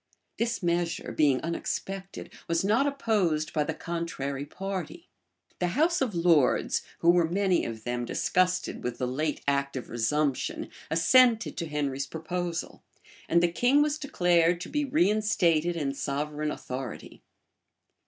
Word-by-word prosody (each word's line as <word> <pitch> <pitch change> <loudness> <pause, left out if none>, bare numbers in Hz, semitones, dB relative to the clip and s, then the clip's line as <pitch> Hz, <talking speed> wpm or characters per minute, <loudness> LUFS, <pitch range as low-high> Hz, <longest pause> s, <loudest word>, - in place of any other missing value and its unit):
This 230 -3 -1
measure, 170 -1 -1
being 140 -4 +3
unexpected, 190 +3 -5
was 165 +1 +1
not 225 +8 +3
opposed 210 - 0
by 150 - +2
the 160 +1 -3
contrary 145 -5 -4
party; 190 -2 -6 0.5
the 180 - +1
house 335 +2 +3
of 240 -8 0
lords, 165 -6 +3 0.2
who 170 - +6
were 175 -2 +3
many 190 0 +2
of 110 -1 -6
them 120 0 -2
disgusted 180 +7 0
with 125 -1 -3
the 125 - -1
late 150 +5 -2
act 140 0 0
of 130 - -5
resumption, 130 +4 -1 0.2
assented 225 +8 +4
to 170 - -3
Henry's 140 -2 -2
proposal; 170 +3 -4 0.5
and 170 +1 +4
the 175 - +3
king 255 +10 +4
was 300 0 -1
declared 175 - +2
to - - -6
be 295 0 0
reinstated 190 - +2
in 145 -4 -1
sovereign 150 +2 -2
authority. 130 -4 -6
170 Hz, 140 wpm, -28 LUFS, 145-195 Hz, 0.5 s, who